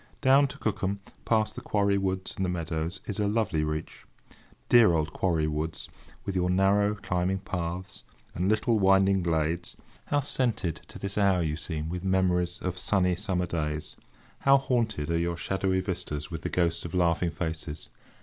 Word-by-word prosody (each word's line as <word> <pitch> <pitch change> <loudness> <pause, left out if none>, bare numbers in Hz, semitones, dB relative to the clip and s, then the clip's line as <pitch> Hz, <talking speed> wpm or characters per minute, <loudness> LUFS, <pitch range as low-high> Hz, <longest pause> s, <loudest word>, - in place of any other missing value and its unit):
Down 135 +2 +5
to 130 - -9
Cookham, 100 -2 -1 0.3
past 110 -2 +2
the - - -7
Quarry 100 -1 +1
Woods 95 -1 -2
and 95 - -2
the 90 - 0
meadows, 85 +1 -3
is 105 - -4
a 105 - +2
lovely 105 -7 +1
reach. 75 0 -5 0.6
Dear 115 -7 +6
old 80 0 0
Quarry 85 -4 +1
Woods! 75 +1 -3 0.4
with 100 - -3
your 90 -1 +1
narrow, 100 +3 +3
climbing 95 -2 -1
paths, 90 0 -5 0.3
and 90 +3 0
little 110 +1 +2
winding 95 0 +4
glades, 85 0 -1 0.3
how 145 - +1
scented 115 - 0
to - - -10
this 100 +1 -2
hour 95 -3 +3
you 75 -1 -1
seem 80 -2 -4
with 90 +2 -4
memories 90 -2 +1
of 90 0 -2
sunny 90 -2 +2
summer 90 -1 -1
days! 75 -3 -3 0.4
How 135 0 +6
haunted 115 - -1
are 85 - +1
your 85 0 -1
shadowy 95 +1 0
vistas 90 -4 -4
with 80 -1 -5
the - - -3
ghosts 85 -2 0
of 85 +1 -6
laughing 85 0 +2
faces! 80 -2 -5
90 Hz, 170 wpm, -28 LUFS, 85-100 Hz, 0.6 s, Dear